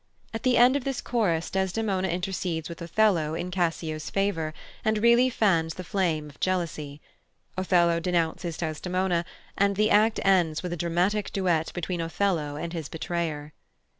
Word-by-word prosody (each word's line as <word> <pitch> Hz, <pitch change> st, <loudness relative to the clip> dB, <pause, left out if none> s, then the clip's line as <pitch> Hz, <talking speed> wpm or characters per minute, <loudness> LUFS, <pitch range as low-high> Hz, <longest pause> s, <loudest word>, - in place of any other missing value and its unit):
At 225 Hz, -, -4 dB
the 255 Hz, -1 st, +3 dB
end 245 Hz, +3 st, +6 dB
of 285 Hz, -, -1 dB
this 270 Hz, -1 st, -2 dB
chorus 180 Hz, -9 st, 0 dB
Desdemona 190 Hz, 0 st, 0 dB
intercedes 180 Hz, -2 st, -2 dB
with 170 Hz, -, -8 dB
Othello 170 Hz, -3 st, +2 dB
in 180 Hz, +2 st, -4 dB
Cassio's 165 Hz, -3 st, -2 dB
favour, 195 Hz, -6 st, 0 dB, 0.3 s
and 220 Hz, -1 st, +2 dB
really 235 Hz, +3 st, +5 dB
fans 170 Hz, -9 st, +1 dB
the 185 Hz, -, -6 dB
flame 165 Hz, -5 st, -1 dB
of 145 Hz, -, -15 dB
jealousy; 160 Hz, -6 st, -2 dB, 0.6 s
Othello 175 Hz, -2 st, +3 dB
denounces 170 Hz, -1 st, -1 dB
Desdemona, 175 Hz, +2 st, -1 dB, 0.3 s
and 200 Hz, 0 st, +2 dB
the 215 Hz, +2 st, +2 dB
act 215 Hz, +2 st, +4 dB
ends 175 Hz, -5 st, +3 dB
with 180 Hz, -1 st, -3 dB
a -, -, -1 dB
dramatic 175 Hz, +5 st, 0 dB
duet 175 Hz, -5 st, 0 dB
between 175 Hz, 0 st, -2 dB
Othello 165 Hz, -3 st, -1 dB
and 170 Hz, +3 st, -5 dB
his 160 Hz, -5 st, -5 dB
betrayer. 160 Hz, -3 st, -3 dB
175 Hz, 155 wpm, -26 LUFS, 165-195 Hz, 0.6 s, end